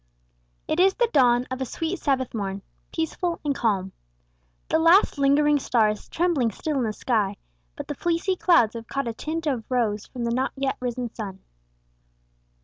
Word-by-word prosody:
It 320 - 0
is 380 +1 +5
the 480 - +2
dawn 245 -3 +4
of 260 +1 -4
a - - 0
sweet 325 +8 -3
Sabbath 265 -3 0
morn, 200 -3 -4 0.3
peaceful 335 +1 -2
and 285 - +1
calm. 200 -7 0 0.8
The 320 - +2
last 330 -1 +5
lingering 290 +1 +4
star 230 -5 +2
is 210 0 -5
trembling 325 -9 +1
still 295 +7 -3
in 255 - +1
the 220 - -1
sky, 210 -3 -1 0.4
but - - -7
the - - -3
fleecy 345 +5 0
clouds 335 - +4
have 230 -1 -8
caught 275 -2 -2
a 230 - -2
tint 315 +7 -4
of 260 -7 -1
rose 220 -5 0
from 245 - -6
the 235 0 0
not 260 +2 -1
yet 270 0 -1
risen 245 -1 -3
sun. 195 -4 -7
260 Hz, 180 wpm, -25 LUFS, 225-315 Hz, 0.8 s, is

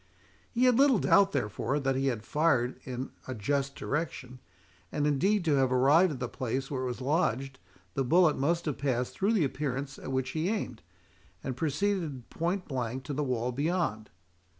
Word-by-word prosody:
He 240 - 0
had 250 -1 +5
little 275 -4 +6
doubt, 200 0 +4
therefore, 130 - -1
that 135 -1 0
he 135 +1 0
had 115 -5 -1
fired 140 -6 +1
in 130 +1 -5 0.2
a 130 - -4
just 140 +5 -1
direction; 135 -4 -4 0.5
and 145 -1 0
indeed 175 +7 +2
to 155 - +3
have 130 -1 +2
arrived 145 +7 +5
at 130 - -7
the 125 - -2
place 130 +3 -3
where 130 -2 -2
it - - -2
was 125 +1 -4
lodged, 135 -2 0 0.3
the 135 - 0
bullet 160 +3 +4
must 170 +5 0
have 150 -4 -2
passed 125 -3 -1
through 200 +4 +1
the 190 -9 +3
appearance 135 0 -3
at - - -6
which 130 -1 -1
he 160 +5 -1
aimed, 165 - -3 0.6
and 130 - -3
proceeded 160 -2 -1
point 175 +3 -2
blank 130 -2 -3
to 145 - -5
the 150 +2 -1
wall 125 -2 -1
beyond. 145 - -1
140 Hz, 185 wpm, -29 LUFS, 130-165 Hz, 0.6 s, little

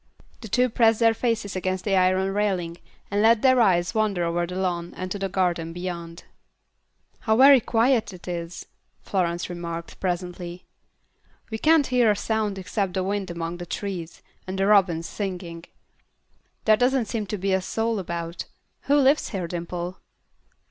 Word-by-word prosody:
The 225 - -7
two 250 +4 +2
pressed 225 -2 +3
their 230 -1 +5
faces 225 -4 -2
against 185 0 -2
the 200 -2 +2
iron 185 +1 +2
railing, 185 -5 -1 0.3
and 205 +1 +1
let 225 0 +4
their 260 -2 +5
eyes 175 -5 +3
wander 210 -5 +1
over 170 +1 0
the 180 - -6
lawn 175 -2 -2
and 185 0 -5
to 205 - -3
the 195 0 -2
garden 175 -3 -1
beyond. 170 -1 -6 1.0
"How 220 0 +1
very 270 +1 +8
quiet 230 -1 +2
it 180 -1 -13
is," 170 -1 -5 0.4
Florence 175 -3 -1
remarked, 170 -1 -6
presently. 180 -1 -4 0.9
"We 220 - -3
can't 315 +1 +4
hear 250 -3 +3
a 210 - +3
sound 215 -1 -1
except 190 0 -2
the 190 - 0
wind 195 0 -2
among 170 0 -4
the 175 0 -8
trees, 180 -4 -5 0.2
and 190 +1 -4
the 195 - +1
robins 185 -5 +3
singing. 180 -4 -5 1.0
There 215 -1 +5
doesn't 250 0 +2
seem 215 -2 -3
to 210 - -3
be 195 0 0
a 190 - +2
soul 225 +3 -1
about. 170 -2 -5 0.4
Who 285 - +3
lives 280 +1 +3
here, 190 -5 -3
Dimple?" 175 +1 -5
190 Hz, 165 wpm, -24 LUFS, 175-220 Hz, 1.0 s, very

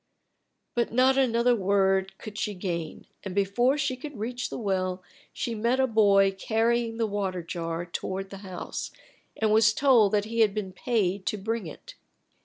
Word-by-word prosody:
But 240 -1 0
not 255 +3 +4
another 245 -2 +3
word 195 -1 +1
could 215 -2 -9
she 210 -1 -2
gain, 170 -4 -4 0.2
and 190 -2 -6
before 240 +8 +2
she 275 -2 -1
could 280 0 -9
reach 245 +4 -3
the - - -5
well 185 -4 -2 0.3
she 235 - -3
met 235 +4 0
a 265 - +4
boy 200 -4 +4
carrying 225 +3 0
the 230 - +1
water 195 -4 -2
jar 165 0 -4
toward 190 +2 -5
the 195 - -7
house, 190 -2 -6 0.5
and 220 -1 +2
was 220 0 +5
told 240 -8 +4
that 205 0 +2
he 230 +1 -4
had 215 -2 +4
been 200 -3 -3
paid 200 -3 -1
to 215 - 0
bring 220 -1 -3
it. 155 - -11
210 Hz, 175 wpm, -27 LUFS, 190-235 Hz, 0.5 s, was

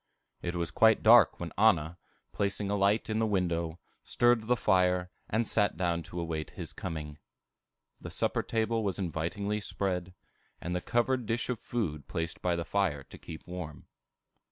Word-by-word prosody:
It 85 0 -3
was 85 -1 -2
quite 110 -1 +4
dark 120 +2 +7
when 85 -2 -5
Anna, 90 -6 +3 0.3
placing 100 0 -1
a - - +2
light 100 +2 +2
in 110 0 -1
the 110 - +2
window, 85 -5 0 0.3
stirred 120 -2 +2
the 125 - +4
fire, 90 -4 +2 0.2
and 110 +1 +1
sat 105 -5 +1
down 85 -1 0
to 90 - -5
await 80 -2 -3
his - - -7
coming. 75 -5 -6 0.8
The - - -8
supper - - 0
table 115 0 0
was 100 -3 -1
invitingly 100 +4 -2
spread, 90 -3 -3 0.4
and 90 +1 -3
the 90 - -1
covered 120 +1 0
dish 115 +2 -1
of 125 -3 -1
food 75 - -3
placed 80 +1 -4
by 90 -1 +1
the 85 0 -3
fire 90 -9 0
to - - -13
keep 80 - -9
warm. 90 -4 -7
95 Hz, 170 wpm, -30 LUFS, 85-110 Hz, 0.8 s, dark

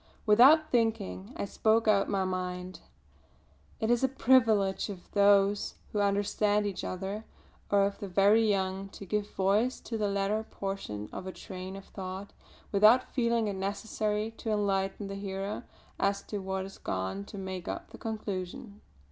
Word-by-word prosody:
Without 270 +9 +6
thinking, 100 - 0
I - - -2
spoke 220 +3 +2
out 200 -2 +4
my 195 -2 +1
mind. 185 -1 -4 1.0
It 220 +1 +1
is 240 +1 +2
a - - +5
privilege 225 -7 +3
of 190 -3 -9
those 200 0 +4 0.2
who 210 - -1
understand 205 +1 +2
each 195 -2 -3
other, 195 +4 -4 0.5
or 200 -1 +4
of 200 0 -3
the 205 - -5
very 205 +4 +4
young, 190 0 -1
to 200 - -8
give 210 +2 -1
voice 205 +7 +2
to 225 -2 -4
the 210 - +1
latter 200 +2 0
portion 195 - -5
of 185 - -6
a - - -3
train 185 0 -8
of 195 - -9
thought 190 +1 -7 0.4
without 215 +5 +5
feeling 235 -3 +1
it 205 - -1
necessary 210 +2 -2
to 225 - -5
enlighten 200 -1 0
the 195 - -5
hearer 195 0 -4 0.3
as 200 0 +1
to 205 - -4
what 190 0 -3
has 195 +1 -10
gone 95 +1 -3
to - - -10
make 190 -2 -5
up - - -5
the - - -11
conclusion. 205 -1 -5
200 Hz, 165 wpm, -30 LUFS, 190-215 Hz, 1.0 s, Without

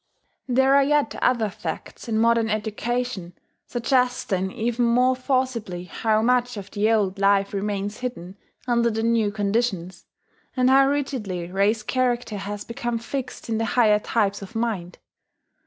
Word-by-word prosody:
There 265 +1 +3
are 280 - +6
yet 295 +1 +2
other 235 -4 +2
facts 165 +4 -7
in 220 -1 0
modern 230 0 +3
education 215 -2 -2 0.3
suggesting 240 -6 0
even 240 +1 -1
more 250 +2 +3
forcibly 255 -8 -1
how 215 +4 0
much 245 -1 +1
of 200 -1 -8
the 210 +1 +1
old 200 -3 +1
life 200 0 +3
remains 205 +1 -3
hidden 230 -8 -6 0.3
under 235 -1 +3
the 225 0 -2
new 230 -2 +2
conditions, 200 -4 -2 0.5
and 255 0 +4
how 270 0 +6
rigidly 230 - -2
race 205 +3 +1
character 245 -2 -1
has 205 +1 -5
become 240 -1 -3
fixed 255 +3 -5
in 225 -1 -1
the 225 - 0
higher 215 -3 +5
types 205 -2 0
of 195 +4 -10
mind. 215 -6 -2
225 Hz, 145 wpm, -24 LUFS, 200-245 Hz, 0.5 s, are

